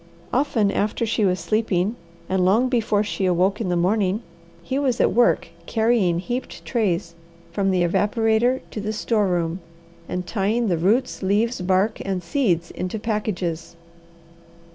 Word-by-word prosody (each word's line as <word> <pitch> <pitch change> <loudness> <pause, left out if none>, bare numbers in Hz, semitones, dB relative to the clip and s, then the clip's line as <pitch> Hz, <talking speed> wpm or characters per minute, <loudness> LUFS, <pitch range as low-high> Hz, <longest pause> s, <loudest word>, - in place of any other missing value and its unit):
Often 240 -6 +2
after 210 +3 0
she 220 -1 +1
was 185 -1 +1
sleeping, 210 +2 0 0.3
and 190 -1 +1
long 220 +8 +3
before 220 -4 +1
she 195 -2 -1
awoke 185 +4 +1
in 195 - -1
the 175 - +1
morning, 195 +4 +1 0.4
he 270 +1 -2
was 260 -4 0
at - - +3
work 240 0 +3 0.2
carry 230 +1 +2
ing 170 - 0
heaped 245 +8 -5
trays 185 -8 -1 0.4
from 195 +3 0
the 185 -2 +2
evaporator 225 +7 +2
to 215 - -5
the 215 +1 -3
store 215 -1 +1
room, 175 -1 -1 0.5
and 180 0 -3
tying 215 +4 0
the 175 - +1
roots, 215 +10 +1
leaves, 210 +4 +1
bark, 190 +4 +1
and 190 -2 -3
seeds 170 - 0
into 185 +4 -4
packages. 185 -7 -3
205 Hz, 155 wpm, -23 LUFS, 180-225 Hz, 0.5 s, long